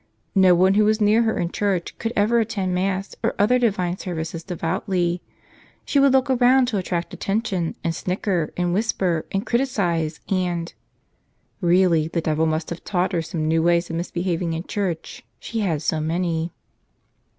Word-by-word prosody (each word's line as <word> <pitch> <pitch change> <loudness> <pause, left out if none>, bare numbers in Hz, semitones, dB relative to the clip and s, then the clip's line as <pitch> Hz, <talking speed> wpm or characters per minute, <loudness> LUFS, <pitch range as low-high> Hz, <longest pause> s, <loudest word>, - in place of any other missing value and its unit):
No 190 -2 +6
one 185 +2 +4
who 210 +1 +4
was 215 +1 +2
near 215 +2 +4
her 225 -1 +1
in 170 0 -1
church 195 -4 -1
could 225 - -2
ever 220 +3 +3
attend 205 -5 -1
Mass 190 +1 -1
or - - 0
other 235 +5 +3
divine 185 -7 0
services 165 -2 -4
devoutly. 175 0 -1 0.6
She 285 - +2
would 275 0 +5
look 265 -1 +3
around 255 0 +4
to 210 -5 -1
attract 175 -2 -3
attention 195 -5 -2
and 165 - 0
snicker 180 -2 -1
and 175 -1 0
whisper 185 -5 0
and 195 +1 -1
criticize 175 - 0
and 175 -3 -1 0.5
— - - -44
Really, 170 -4 +3
the 170 +1 -2
devil 160 0 +1
must 155 +1 -2
have 170 - -6
taught 185 -1 0
her 170 - +1
some 160 -1 -3
new 160 +1 +2
ways 170 0 +2
of - - -3
misbehaving 175 0 -2
in 165 +1 -3
church; 185 -5 -4 0.2
she 230 - -4
had 165 -8 -1
so 155 0 0
many. 165 +1 -1
180 Hz, 175 wpm, -23 LUFS, 170-205 Hz, 0.6 s, No